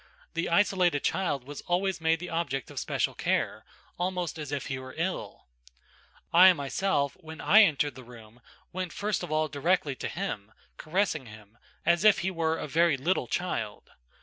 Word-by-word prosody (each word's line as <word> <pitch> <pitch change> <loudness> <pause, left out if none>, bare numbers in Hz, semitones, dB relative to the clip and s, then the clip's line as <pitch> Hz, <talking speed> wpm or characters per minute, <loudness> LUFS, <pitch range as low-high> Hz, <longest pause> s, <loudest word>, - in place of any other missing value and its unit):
The 165 - -1
isolated 175 -4 +3
child 170 -9 0
was 145 +2 -8
always 180 0 0
made 160 0 +2
the 180 - -7
object 140 -7 -2
of - - -4
special - - -1
care, - - -1 0.4
almost 180 -2 -2
as 150 -2 -6
if 145 -1 -3
he 130 -1 -3
were 130 0 -10
ill. 175 +3 -3 0.9
I 185 +2 +9
myself, 140 0 -1
when 160 -2 -10
I 215 +3 +7
entered 145 -7 +3
the 130 +1 -11
room, 120 -1 -14 0.3
went 185 -2 -4
first 210 0 -1
of 175 - -6
all 155 0 +1
directly 155 +1 0
to - - -4
him, 110 - -5 0.2
caressing 160 -5 -1
him, 110 0 -14 0.3
as 170 +1 +3
if 215 -1 +7
he 190 - +1
were 165 -2 0
a - - -5
very 165 0 +3
little 170 +8 0
child. 175 - -3
160 Hz, 175 wpm, -28 LUFS, 140-180 Hz, 0.9 s, I